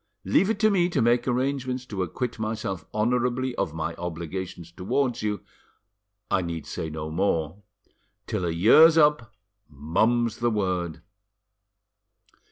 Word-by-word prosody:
Leave 175 - +3
it 225 - 0
to 215 +1 +3
me 180 -3 +2
to - - -1
make 120 +2 +2
arrangements 130 0 -1
to 100 -6 -4
acquit 115 +7 -3
myself 110 -6 -3
honourably 125 +3 0
of - - -1
my 80 +1 -3
obligations 90 0 -6
towards 120 +8 -1
you. 105 -3 -2 0.9
I - - +3
need 85 -2 -5
say 80 - -5
no 80 0 -5
more; 85 0 -1 0.6
till - - -3
a 85 - 0
year's 120 - +6
up, 150 -7 +3 0.4
mum's 110 +11 0
the 120 0 +1
word." 90 -6 -2
105 Hz, 135 wpm, -25 LUFS, 85-125 Hz, 0.9 s, year's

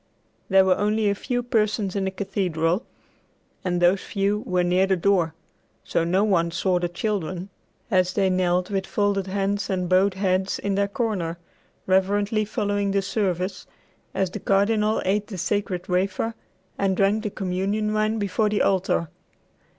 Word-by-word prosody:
There 190 0 +6
were 185 -1 +3
only 210 0 +2
a - - +2
few 245 +4 -2
persons 215 -4 0
in 195 -1 0
the - - 0
cathedral, 190 -2 -1 0.8
and 180 -1 0
those 175 +2 +4
few 200 +1 -1
were 180 -1 +1
near 180 +2 +2
the 190 - +3
door; 175 -3 +1 0.5
so 165 - 0
no 185 +4 +2
one 175 -5 +2
saw 180 +1 0
the 175 0 -1
children 185 -1 -3 0.4
as 185 -1 +2
they 195 -2 +2
knelt 180 0 +1
with 195 -1 -1
folded 200 -2 0
hands 200 +1 -1
and 185 -2 -1
bowed 185 +2 +3
heads 190 0 0
in 200 - -2
their 200 +1 +1
corner, 200 -6 -2 0.5
reverently 205 +3 +2
following 205 -2 -1
the 195 0 +1
service 185 -2 -2 0.5
as 190 -2 0
the - - -5
Cardinal 210 +2 +2
ate 205 +2 +1
the 195 - -7
sacred 185 -1 -2
wafer 190 +5 0 0.5
and 195 -1 +1
drank 200 +2 +2
the 215 - -2
communion 195 +3 -1
wine 215 +1 +1
before 210 +1 0
the 210 - +1
altar. 190 -3 +1
195 Hz, 160 wpm, -24 LUFS, 185-205 Hz, 0.8 s, There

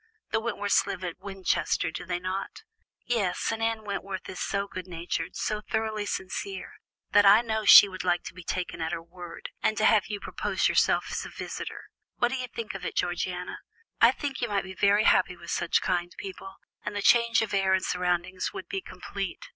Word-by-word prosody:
The 225 - +2
Wentworths 205 -3 +1
live 185 - -4
at 175 -1 -5
Winchester, 190 -5 -1
do 175 - -7
they 175 -1 -1
not?" 185 - -4 0.4
"Yes, 210 -7 0
and 225 0 -3
Anne 225 -1 0
Wentworth 195 -2 -4
is 185 - -7
so 200 0 -1
good 185 -2 -7
hearted, 165 -1 -3
so 215 0 -2
thoroughly 215 -1 -2
sincere, 385 - -4 0.4
that 205 - +6
I 205 +3 +7
know 220 -2 -2
she 205 - +11
would 185 -1 -6
like 175 -1 +1
to - - -8
be 185 - -10
taken 180 -1 -3
at 160 - -2
her 165 - -4
word, 175 0 -9
and 215 - +1
to 215 - +2
have 215 -3 +5
you 205 -1 -4
propose - - -1
yourself - - +2
as - - -2
a - - -7
visitor. - - -6 0.3
What 240 - +2
do 265 - -2
you 255 0 -3
think 230 -3 -6
of 195 - -7
it, - - -4
Georgiana? 180 0 -2 0.4
I - - +9
think 280 -3 -4
you 240 - +1
might 200 -2 0
be 190 0 -8
very 200 +2 +4
happy 180 -4 +3
with 170 0 -8
such - - +1
kind 175 -1 0
people, 195 0 -8 0.3
and 210 - -4
the 205 - -2
change 235 -1 +5
of 220 - -5
air 195 -1 +3
and 190 - -1
surroundings 180 +1 -1
would - - -7
be 390 -2 -3
complete. - - -6
195 Hz, 210 wpm, -28 LUFS, 180-220 Hz, 0.4 s, she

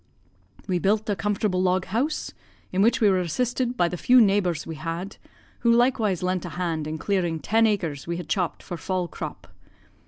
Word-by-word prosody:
"We 180 -2 0
built 210 +5 +1
a - - +1
comfortable 205 -3 0
log 185 0 +1
house, 260 +10 -1 0.4
in 185 - +1
which 235 +4 +3
we 215 - +6
were 185 - +2
assisted 245 +8 -1
by 175 - +3
the 180 - -4
few 250 +8 +5
neighbours 195 -7 +2
we 165 - -5
had, 165 +5 -5 0.4
who 235 - +3
likewise 235 -6 +2
lent 185 0 0
a 175 - -5
hand 165 -4 -2
in 155 +1 -3
clearing 175 -3 -1
ten 225 +6 +3
acres 170 -10 -2
we 170 0 -2
had 175 -3 -6
chopped 180 +2 -1
for 175 - -6
fall 185 0 -2
crop. - - -7
185 Hz, 190 wpm, -25 LUFS, 170-220 Hz, 0.4 s, we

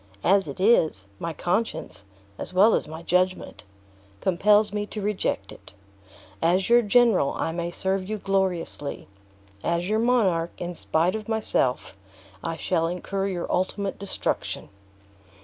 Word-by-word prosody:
As 195 -1 +4
it 140 - -7
is, 165 - +3
my 165 - -3
conscience, 175 - -2 0.3
as - - -5
well 210 +5 +6
as - - 0
my 160 +2 -8
judgment, 180 -5 0 0.6
compels 205 - +3
me 210 0 -2
reject 210 -1 -2
it. - - -14 0.7
As 180 +4 +2
your 240 0 +7
general, 225 - +3
I - - -1
may 170 +1 -3
serve 190 +2 -2
you 215 - -2
gloriously; 190 -7 -2 0.6
as 170 +2 0
your 215 +1 +2
monarch, 200 -9 +2
in 175 0 -4
spite 170 +1 +1
of 220 0 -5
myself, 210 - 0 0.5
I 165 - -3
should 165 -2 0
incur 195 +3 -2
your 180 -3 -3
ultimate 195 +2 -1
destruction." 200 -1 -2
185 Hz, 135 wpm, -25 LUFS, 170-210 Hz, 0.7 s, your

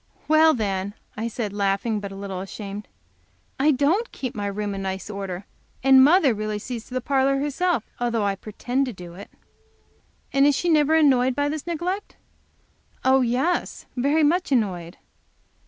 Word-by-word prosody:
"Well, 315 +1 +5
then," 200 -2 -2 0.2
I 220 +2 -3
said, 220 -3 -4
laughing, 205 +2 0
but 200 -1 -6
a - - -8
little 195 -1 -5
ashamed, 200 +1 -7 0.7
"I 285 +3 +4
don't 305 - +2
keep 255 -3 -5
my 205 -1 -3
room 205 0 -3
in 195 - -4
nice 190 +2 -4
order, 195 -2 -5 0.4
and 265 0 +7
mother 300 -3 +5
really 215 0 -3
sees 230 +2 -6
to 255 - -8
the 255 - 0
parlor 275 +1 +2
herself, 295 0 0
though 235 -3 0
I 200 - +1
pretend 245 +7 -2
to 250 - -4
do 175 -2 -10
it." 200 +3 -11 1.0
"And 275 +1 +5
is 290 - +3
she 350 - 0
never 310 -1 +4
annoyed 260 -5 +4
by 285 0 0
this 305 +1 -5
neglect?" 355 +4 -3 0.9
"Oh, 265 0 +5
yes, 255 +9 0
very 285 +5 +2
much 345 +3 +2
annoyed." 185 -8 -1
245 Hz, 170 wpm, -24 LUFS, 200-290 Hz, 1.0 s, and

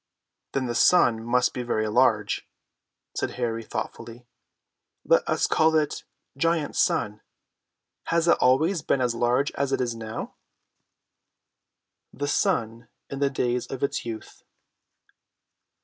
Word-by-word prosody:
"Then 135 -1 0
the 120 - -2
sun 120 -4 +4
must 125 +2 +1
be 125 - -4
very 110 -3 -1
large," 110 -2 +1 0.7
said - - -2
Harry 115 -2 -2
thoughtfully. 115 +2 -7 0.8
"Let - - +4
us - - +2
call 160 0 +3
it 155 -2 0 0.3
GIANT 165 +1 0
SUN. 105 0 0 0.8
Has 170 0 +1
it 170 - +4
always 155 +8 +3
been 140 - 0
as 125 -2 +1
large 120 +4 +1
as 140 -1 -2
it - - +1
is 120 -2 -1
now?" 110 -1 -6 1.8
THE 145 +2 -4
SUN 115 -4 0 0.2
IN 135 - -4
THE 140 -1 +2
DAYS 125 -2 -1
OF 135 - -6
ITS 140 - -1
YOUTH. 110 -2 -8
125 Hz, 130 wpm, -25 LUFS, 115-140 Hz, 1.8 s, sun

